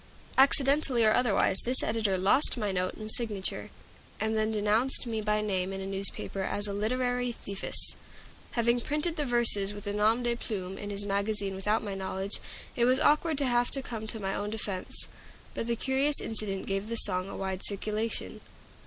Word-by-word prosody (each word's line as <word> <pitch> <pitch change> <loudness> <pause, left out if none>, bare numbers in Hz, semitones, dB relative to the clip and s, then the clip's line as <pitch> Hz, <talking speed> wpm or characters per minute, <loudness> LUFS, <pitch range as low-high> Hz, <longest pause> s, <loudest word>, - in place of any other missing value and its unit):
Accidentally 275 -2 +6
or 215 - +5
otherwise, 215 -5 +3
this 250 +2 +2
editor 215 -3 0
lost 200 +10 +4
my 210 -4 -1
note 185 -1 -2
and 215 0 -8
signature, 215 -6 -1 0.5
and 220 0 -1
then 215 0 0
denounced 220 +5 +1
me 225 -2 -3
by 210 0 0
name 190 -3 -1
in 195 - -5
a 190 - -5
newspaper 195 0 0
as 205 +2 +1
a 200 - -1
"literary 245 +3 -1
thiefess;" 200 -4 0 0.6
having 235 0 +1
printed 300 +6 -1
the 295 - -2
verses 225 -5 0
with 205 +1 -9
a 205 - -2
nom 220 +4 +2
de 240 0 0
plume 195 -5 -5
in 205 - -7
his 205 0 -2
magazine 200 0 -1
without 210 +4 0
my 205 -2 -4
knowledge. 190 +1 -4 0.4
It 240 - +2
was 255 +2 +4
awkward 305 +1 +3
to 280 - +1
have 245 -1 +2
to 270 - -3
come 220 -3 -6
to 220 - -4
my 195 -1 -3
own 205 0 -3
defense. 205 -4 -3 0.5
But 230 - -4
the 235 - 0
curious 270 +4 +1
incident 205 -3 -1
gave 195 +2 -3
the 230 - -2
song 185 -4 +2
a - - -7
wide 190 -1 -4
circulation. 215 +2 -2
215 Hz, 190 wpm, -29 LUFS, 200-240 Hz, 0.6 s, Accidentally